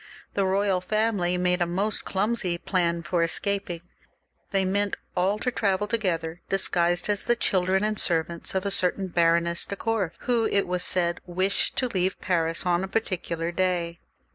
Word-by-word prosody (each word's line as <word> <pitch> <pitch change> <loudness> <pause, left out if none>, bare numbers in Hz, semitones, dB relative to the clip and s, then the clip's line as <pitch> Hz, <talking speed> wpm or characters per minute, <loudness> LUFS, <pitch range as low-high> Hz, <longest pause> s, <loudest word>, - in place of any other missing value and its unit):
The 195 -1 +1
royal 195 -1 +1
family 200 -3 +1
made 180 0 +1
a 175 - +2
most 195 +5 -1
clumsy 195 -3 0
plan 170 -2 0
for 170 +2 0
escaping. 175 0 0 0.7
They 195 -2 +2
meant 200 +1 +1 0.2
all 190 +3 +1
to 250 +4 -1
travel 200 -3 +1
together, 175 -7 -2
disguised 175 -2 +1
as 205 -1 0
the 240 - +2
children 190 -3 +1
and 215 0 0
servants 170 +1 0
of 190 +1 0
a 200 - +1
certain 185 0 +1
Baroness 170 0 +2
de 200 - -4
Korff, 205 -5 -1
who, 235 -3 +1
it 200 - +1
was 180 0 -2
said, 175 -1 +1
wished 185 +3 0
to 255 - +1
leave 185 -4 -1
Paris 165 -2 0
on 175 0 +2
a - - -3
particular 175 -5 -2
day. 175 -2 -1
185 Hz, 165 wpm, -26 LUFS, 175-200 Hz, 0.7 s, a